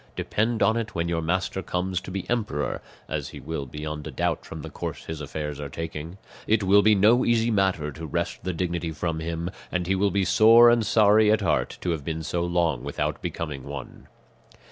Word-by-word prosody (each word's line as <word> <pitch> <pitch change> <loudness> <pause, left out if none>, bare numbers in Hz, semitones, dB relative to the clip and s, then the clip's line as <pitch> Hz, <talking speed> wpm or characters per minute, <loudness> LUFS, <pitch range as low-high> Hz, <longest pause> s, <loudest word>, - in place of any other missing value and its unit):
Depend 110 +2 0
upon 110 - +3
it 110 -3 -4
when 85 0 0
your 85 -1 -1
master 90 +3 -1
comes 90 0 -2
to 95 - -9
be 95 0 -4
emperor 105 -12 -1 0.3
(as - - -3
he - - -9
will 80 -4 -5
beyond 75 +2 -6
a - - -6
doubt - - -1
from 80 -2 -8
the - - -6
course - - -6
his 80 -1 -6
affairs 75 0 -5
are 70 -1 -5
taking), 80 +3 -6 0.3
it 110 -1 +3
will 100 +2 +6
be 105 +1 +5
no 110 +5 +5
easy 115 0 +2
matter 95 -7 +1
to 80 +4 -8
wrest - - -3
the 90 - -1
dignity 85 -1 -2
from 80 0 -3
him, 85 +2 -3 0.2
and 90 -1 -1
he 95 - +1
will 100 +1 +2
be 100 0 +1
sore 115 +4 +7
and 115 -3 +2
sorry 105 0 +5
at 110 -1 +3
heart - - 0
to 90 - -1
have 80 -4 -3
been 80 +1 -3
so 85 +2 -2
long 85 -6 0
without - - -2
becoming 75 -5 -4
one." 70 -2 -8
90 Hz, 210 wpm, -25 LUFS, 80-105 Hz, 0.3 s, sore